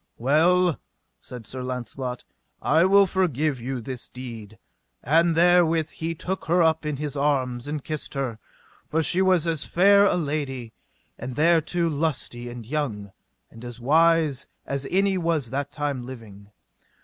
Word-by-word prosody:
Well, 165 +6 +3 0.4
said 125 -3 -10
Sir 130 +4 -6
Launcelot, 125 0 -5 0.4
I 160 +4 +3
will 200 +1 +6
forgive 155 -8 0
you 130 +2 -3
this 125 +1 -7
deed; 115 -4 -9 0.5
and 165 +5 +3
therewith 165 -2 +3
he 165 +1 -4
took 185 +4 -4
her 175 +1 +3
up 160 -1 +1
in 150 -2 -2
his 150 0 -4
arms, 135 -3 0
and 150 -1 -4
kissed 155 -2 -5
her, 130 -5 -3 0.5
for 160 +1 +1
she 180 +4 +2
was 185 -3 +3
as 165 -3 -1
fair 200 +3 +5
a 200 - +3
lady, 140 -7 -3 0.5
and 125 +1 -6
thereto 170 +2 +2
lusty 140 -6 -2
and 120 -2 -8
young, 115 -7 -3 0.4
and 115 +1 -13
as 120 -1 -8
wise, 155 0 +3 0.2
as 140 0 -3
any 195 0 +2
was 160 -8 -1
that 140 +1 -3
time 145 -4 -3
living. 110 -5 -11
145 Hz, 150 wpm, -24 LUFS, 125-165 Hz, 0.5 s, will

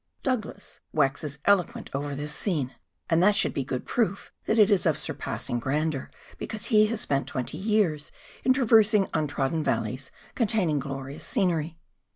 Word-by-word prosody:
Douglas 255 -5 -3
waxes 145 0 0
eloquent 200 -4 +2
over 140 +1 -2
this 150 +1 -4
scene, 150 - -1 0.3
and 165 0 +3
that 205 +2 +5
should - - +1
be 140 - -1
good 125 -1 -4
proof 200 -5 -1
that 220 - +1
it 210 -1 +6
is 190 -3 +3
of 160 - +2
surpassing 120 - -3
grandeur, 145 +2 -1 0.3
because 220 -1 -5
he 215 0 +7
has 225 0 -2
spent 140 -7 0
twenty 130 +4 -4
years 190 -8 +1 0.3
in 260 - +4
traversing 220 -5 +5
untrodden 150 +1 0
valleys 125 +3 -2 0.2
containing 200 - +1
glorious 135 +1 -6
scenery. 170 - 0
160 Hz, 155 wpm, -27 LUFS, 140-210 Hz, 0.3 s, he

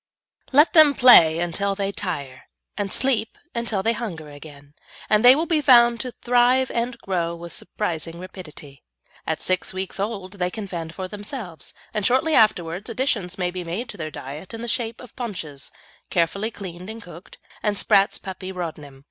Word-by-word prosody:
Let 295 +4 +5
them 310 -4 +7
play 165 -11 +8
until 175 +4 -1
they 195 0 -2
tire, 145 -10 -5 0.3
and 200 -2 -3
sleep 240 -4 +1 0.2
until 230 -5 -2
they 230 - +2
hunger 170 -11 -6
again, 145 -1 -13 0.4
and 210 +1 +4
they 250 +2 +9
will 320 +3 0
be 325 -3 +1
found 240 -4 +6
to 255 - -4
thrive 250 +2 +3
and 235 +1 -2
grow 170 -3 -2
with 170 0 -9
surprising 170 -4 -4
rapidity. 155 -7 -10 0.5
At - - -2
six 185 0 0
weeks 190 +1 -4
old 200 -2 -4
they 180 0 0
can 215 +2 -6
fend 165 -3 -6
for 185 -1 -4
themselves, 205 - -6 0.2
and 210 - -1
shortly 260 +8 +2
afterwards 200 - +2
additions 225 -7 -1
may 180 -1 -1
be 180 0 -5
made 185 +9 -4
to 205 - -8
their 155 -3 -4
diet 150 - -8
in 225 - -7
the - - -4
shape 230 -1 -2
of 250 - -14
paunches, 165 - -6 0.4
carefully 190 +5 0
cleaned 185 -3 -9
and 225 +1 -7
cooked, 175 0 -13 0.2
and 210 -1 0
Spratt's 195 0 +3
Puppy 185 0 -7
Rodnim. 155 -6 -7
195 Hz, 175 wpm, -23 LUFS, 170-235 Hz, 0.5 s, they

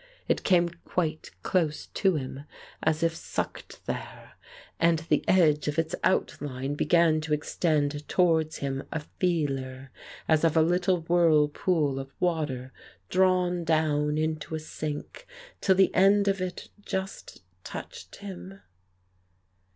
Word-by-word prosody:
It - - +1
came 175 -2 +4
quite 160 -3 -2
close 160 -5 0
to 190 -3 +1
him, 135 0 -5 0.4
as 160 +1 +1
if 165 0 +1
sucked - - -5
there, - - -6 0.5
and 170 0 +4
the 160 -2 0
edge 155 -6 +4
of 150 +1 -1
its 165 +1 0
outline 140 -6 -1
began 155 +1 +3
to 155 -1 0
extend 150 -1 -1
towards 160 -3 +2
him 135 -1 -3
a 160 - -2 0.2
feeler, 135 -7 -1 0.4
as 160 -1 +3
of 165 -1 +3
a 160 - +6
little 175 +1 +2
whirlpool 160 -3 +2
of 135 0 -6
water 145 -7 -1 0.4
drawn 180 -2 +2
down 155 -2 +1
into 155 0 -2
a - - -3
sink, 155 - -6 0.3
till 190 - +4
the 190 0 +4
end 200 +2 +4
of 195 -1 +1
it 185 -1 -5
just 190 - -5 0.2
touched - - -8
him. 95 0 -9
160 Hz, 130 wpm, -27 LUFS, 145-175 Hz, 0.5 s, a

